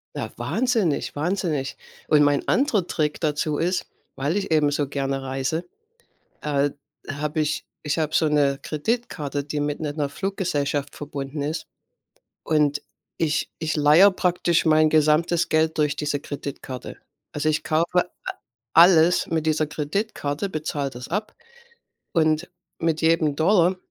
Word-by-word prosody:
Ja, - - -3
wahnsinnig, 225 - 0
wahnsinnig. 155 -4 -1 0.3
Und 150 -1 +5
mein 145 -1 +2
anderer 245 - +2
Trick 150 -4 -1
dazu 150 -1 0
ist, 180 +2 0 0.3
weil 145 +8 -1
ich 195 -4 -3
eben 150 -2 +4
so 145 -1 -1
gerne 135 -1 -2
reise, 135 +5 -2 0.7
äh, 145 -1 +1 0.4
habe 150 +2 -2
ich 150 - -1 0.2
ich 150 +2 -1
habe 155 -1 0
so 160 - +3
'ne 140 -2 +2
Kreditkarte, 155 - -2
die 150 +1 -3
mit 145 0 -1
'ner 150 -2 -2
'ner 145 -2 -1
Fluggesellschaft 150 -8 -2
verbunden 145 0 -5
ist. 155 +3 -3 0.8
Und 150 -2 +2 0.4
ich 155 -2 0
ich 160 -1 -1
leihe 155 +6 +7
praktisch 175 -2 +1
mein 155 0 +5
gesamtes 155 +3 +3
Geld 160 0 +2
durch 150 -2 +1
diese 145 -1 -1
Kreditkarte. 140 -3 -7 0.4
Also, 150 +1 0
ich 155 +1 0
kaufe 165 +3 +1
a 180 - -24 0.7
alles 170 0 +6
mit 160 -1 -1
dieser 155 0 +2
Kreditkarte, 150 +2 -3
bezahle 150 -4 -3
das 125 -1 -9
ab 210 +5 -3 0.8
und 155 0 +1 0.3
mit 165 -1 0
jedem 160 -3 +2
Dollar 180 +1 +3
155 Hz, 140 wpm, -24 LUFS, 145-170 Hz, 0.8 s, leihe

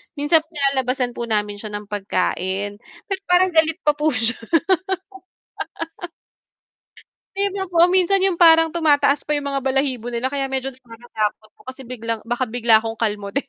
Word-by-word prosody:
Minsan 310 +2 +3
nilalabasan 265 -3 0
po 235 - -3
namin 210 -2 -1
siya 210 0 -7
ng 205 -1 -7
pagkain, 195 0 -2 0.3
pero 390 -1 -2
parang 360 +1 +4
galit 320 -1 +2
pa 300 - +4
po 300 +1 0
siya. 240 +1 +1 3.0
Pino 395 -1 -1
po 340 +1 +5
minsan 375 +1 +3
yung 380 -2 +1
parang 325 -1 +6
tumataas 295 -3 +2
pa 300 - -2
yung 290 -1 -1
mga 275 -1 -3
balahibo 260 -3 -1
nila 240 +2 -1
kaya 270 -1 -3
medyo 265 0 -1
nakakatakot 230 -4 -5
po - - -33
kasi 260 +1 -9
biglang 230 -2 -4
baka 240 +2 0
bigla 235 -1 +3
akong 225 +1 -2
kalmutin. 210 +4 -2
260 Hz, 150 wpm, -21 LUFS, 225-315 Hz, 3.0 s, parang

